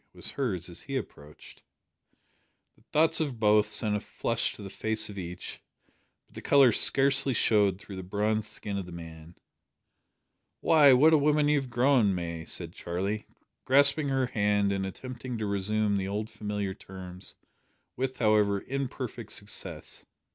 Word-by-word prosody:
was - - -2
hers 100 - -2
as 85 -1 -8
he 135 -1 -4
approached. 75 - -10 1.1
The - - -27
thoughts 160 +2 +3
of 140 -7 -2
both 105 -1 +3
sent 105 0 0
a - - 0
flush 115 +2 -2
to 105 - -10
the 100 - -7
face 110 +1 -1
of 100 -1 -7
each, 90 -1 -7 0.6
but - - -28
the - - -9
colour 140 -4 +5
scarcely 135 +2 +4
showed 105 -4 +3
through 100 -2 -10
the - - -5
bronzed 105 +3 -1
skin 100 -1 -5
of 95 - -7
the - - -10
man. 80 0 -11 1.2
"Why, 150 -4 +6
what 155 +6 +5
a 155 - +6
woman 150 0 +2
you 150 -1 +3
have 130 - -9
grown, 120 -5 +3
May!" 85 -2 -5
said 85 -2 +1
Charlie, 95 +5 -4 0.4
grasping 140 +2 +4
her 135 -1 +1
hand, 105 -3 +1
and 95 -1 -2
attempting 125 +4 -7
to 110 - -3
resume 100 +1 0
the 95 -1 -2
old 105 +2 -4
familiar 105 -2 -4
terms 95 -1 -8 0.6
with, 130 0 -3
however, 105 -3 +2
imperfect 125 -4 -5
success. 100 0 -6
105 Hz, 160 wpm, -28 LUFS, 95-130 Hz, 1.2 s, Why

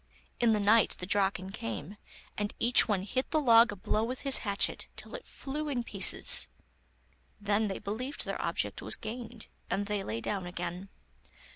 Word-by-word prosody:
In 240 -2 +3
the 215 - +1
night 210 +2 +4
the 180 - -6
Draken 195 -1 0
came, 130 - -6 0.4
and 205 +1 -4
each 240 +1 +6
one 200 -4 -1
hit 255 +6 -3
the 315 - +1
log 235 -4 +5
a - - -6
blow 210 +3 -1
with 250 +3 -4
his 275 -2 +5
hatchet, 200 -3 -2
till - - -8
it - - -9
flew 300 +2 -6
in 250 -4 -2
pieces. - - +5 0.9
Then 210 +1 0
they 195 - -4
believed 245 +7 -5
their - - -4
object - - -3
was - - -3
gained, 230 0 -8 0.2
and 200 +1 -1
they 205 -1 -3
lay 110 - -4
down 190 - -4
again. 175 +2 -6
210 Hz, 175 wpm, -30 LUFS, 195-240 Hz, 0.9 s, each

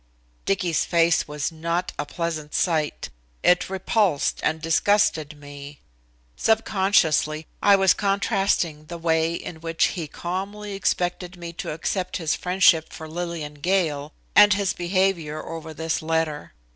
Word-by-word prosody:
Dicky's 180 -5 +1
face 170 -1 +2
was 150 +2 -3
not 170 +3 -2
a 145 - -2
pleasant 160 -3 -4
sight. 155 -4 0 0.3
It 180 +1 +3
repulsed 190 -4 +1
and 160 +1 0
disgusted 160 -2 +1
me. 145 0 -10 0.6
Subconsciously 190 -8 +2 0.2
I 200 - +6
was 195 -1 +5
contrasting 195 -6 0
the 170 +2 -7
way 165 0 +1
in 160 -1 -7
which 165 0 +1
he 170 -5 -4
calmly 195 +6 -5
expected 180 -1 -1
me 170 -1 -7
to - - -6
accept 180 +4 -2
his 165 -3 -1
friendship 180 -3 +3
for 160 - -8
Lillian 165 -2 -5
Gale, 155 -5 0 0.2
and 205 0 +8
his 200 -2 0
behavior 175 -4 -1
over 160 -1 -7
this 160 +1 -2
letter. 160 -2 -2
170 Hz, 135 wpm, -24 LUFS, 155-190 Hz, 0.6 s, and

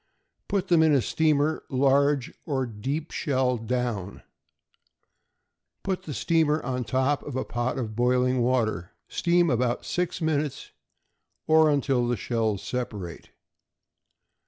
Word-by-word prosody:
Put 200 -2 -1
them 170 -2 +5
in 160 -1 +4
a 135 - +3
steamer, 155 -1 +1
large 140 0 +2
or 135 -4 0
deep 135 +8 -4
shell 130 -4 0
down. 115 -4 -3 1.6
Put 190 -1 -2
the 150 - -5
steamer 160 -2 +2
on 125 -1 -2
top 130 +4 +1
of 145 - -7
a 130 - -1
pot 120 +2 -2
of 110 -4 -4
boiling 125 +1 +2
water; 115 -7 0
steam 175 -1 +2
about 120 0 0
six 180 0 -2
minutes, 150 -4 -2 0.7
or 160 0 +5
until 135 -4 +1
the 120 -1 0
shells 110 -4 -1
separate. 105 -9 -5
130 Hz, 125 wpm, -26 LUFS, 120-155 Hz, 1.6 s, them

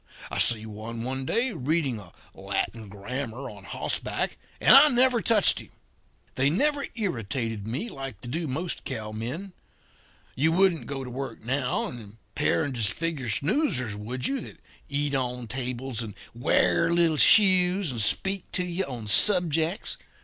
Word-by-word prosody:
I - - -2
see 110 -2 +4
one, 110 +2 -7
one 130 +1 -3
day, 235 - +1
reading 150 - -1
a 95 -4 -14 0.2
Latin 110 -3 -4
grammar 125 +5 -6
on 100 -2 -13
hossback, - - -2 0.2
and - - +7
I 280 +2 +9
never 250 -3 +3
touched 220 -4 +4
him! - - -12 0.6
They 135 +2 +2
never 285 - +1
irritated 115 - -3
me 130 - -3
like 135 - -7
they - - -8
do 160 +6 -3
most 160 +7 -3
cowmen. 120 - -5 0.8
You 160 +5 +2
wouldn't 185 -3 +2
go 135 -1 -4
to 125 - -7
work 130 -3 -6
now, 130 0 0
and 120 - -5
impair 105 +6 -2
and 145 -3 -3
disfigure 125 +5 -1
snoozers, 140 - 0
would 120 +5 -5
you, 270 -2 -1
that - - -11 0.3
eat 145 0 -1
on 125 -2 -2
tables 125 0 -3
and 110 -3 -7 0.2
wear 150 +7 +2
little 170 -2 +3
shoes 185 -3 +4
and 115 -3 -3
speak 190 - +1
to 180 - +1
you 180 +2 -2
on 120 -5 -7
subjects? 170 - +4
135 Hz, 155 wpm, -26 LUFS, 115-175 Hz, 0.8 s, I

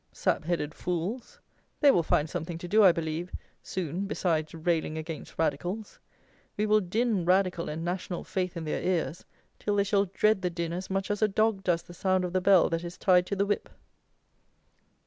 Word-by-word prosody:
Sap - - 0
headed 155 -3 -1
fools! 180 +8 -4 0.4
They 285 -2 +7
will 175 - +3
find 155 -1 +1
something 165 +2 -4
to 175 - -7
do, 215 +4 +5
I 190 - +9
believe, 165 +1 -3 0.3
soon, 185 +2 -3
besides 160 -5 -1
railing 160 -1 -1
against 160 -1 -7
radicals. 175 +7 -2 0.6
We 210 - +1
will 215 0 +4
din 210 +1 0
"radical" 180 -1 +2
and 160 +2 -4
"national 180 0 -3
faith" 185 -2 -3
in 165 - -4
their 155 - -2
ears, 175 -2 -1 0.3
till 205 - -1
they 200 - +3
shall 200 0 +2
dread 195 +2 +2
the 180 - 0
din 170 -1 -3
as 185 +2 -5
much 195 +1 -1
as 205 - -2
a 215 - +5
dog 215 -1 +1
does 170 -2 +1
the 175 - -12
sound 185 +1 +1
of 180 - -5
the 185 - +2
bell 190 -1 +5
that 165 +1 -1
is 175 0 -7
tied 180 -2 +4
to 200 - -2
the 200 +1 +1
whip. 205 0 -1
180 Hz, 195 wpm, -28 LUFS, 170-200 Hz, 0.6 s, I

